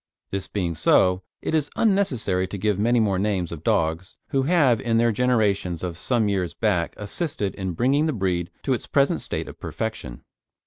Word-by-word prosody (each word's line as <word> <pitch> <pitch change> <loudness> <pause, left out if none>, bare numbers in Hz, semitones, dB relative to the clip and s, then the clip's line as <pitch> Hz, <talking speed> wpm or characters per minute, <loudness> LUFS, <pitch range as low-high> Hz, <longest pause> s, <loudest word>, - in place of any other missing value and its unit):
This 95 -1 -3
being 90 -5 -2
so, 90 +3 +3 0.2
it - - -2
is 150 -2 +1
unnecessary 130 - +1
to 100 - -6
give 105 0 0
many 120 +3 +3
more 100 -4 +1
names 95 -4 -1
of 80 -2 -7
dogs 80 +3 0
who 135 - +1
have 135 -6 +3
in 115 -2 +1
their 115 0 +3
generations 105 -8 +1
of 90 -2 -3
some 115 +4 +1
years 95 -4 -1
back 95 -7 0
assisted 105 - -3
in 95 -2 -4
bringing 135 - +2
the - - +1
breed 90 -5 -1
to 135 - +1
its 120 - -4
present 140 -1 +2
state - - -3
of - - -11
perfection. - - -5
105 Hz, 185 wpm, -24 LUFS, 90-125 Hz, 0.2 s, so